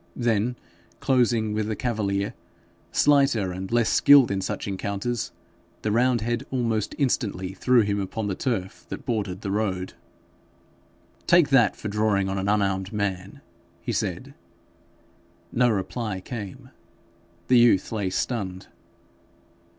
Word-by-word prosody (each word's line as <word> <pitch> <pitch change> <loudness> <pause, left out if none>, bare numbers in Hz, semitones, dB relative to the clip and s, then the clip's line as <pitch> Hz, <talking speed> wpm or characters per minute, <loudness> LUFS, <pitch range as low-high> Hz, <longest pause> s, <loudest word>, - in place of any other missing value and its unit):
Then 120 0 0 0.4
closing 120 -4 +2
with 105 0 -1
the 110 - -2
cavalier, 100 -4 -1 0.6
slighter 135 -10 +3
and 95 +2 -6
less 120 -1 +3
skilled 140 -5 +6
in 95 -1 -1
such 95 - -4
encounters, 100 +3 -3 0.5
the 110 - 0
roundhead 120 +1 +1
almost 115 -5 -1
instantly 100 -9 -1
threw 125 +4 +3
him 100 -1 0
upon 100 +3 -3
the 100 - -1
turf 95 -4 -3
that - - -7
bordered 100 -5 -2
the 100 - -3
road. 95 -3 -2 1.3
'Take 170 -4 +5
that 135 -5 +4
for - - -6
drawing 105 -2 +1
on 95 0 -2
an 95 +1 -1
unarmed 95 -2 0
man,' 100 -2 -3 0.4
he - - -2
said. 95 +10 -3 1.2
No 125 0 +3
reply 105 0 -2
came. 100 -1 -8 0.8
The 125 -1 +6
youth 120 -6 +4
lay 105 -4 -1
stunned. 95 -3 -3
105 Hz, 125 wpm, -25 LUFS, 95-120 Hz, 1.3 s, skilled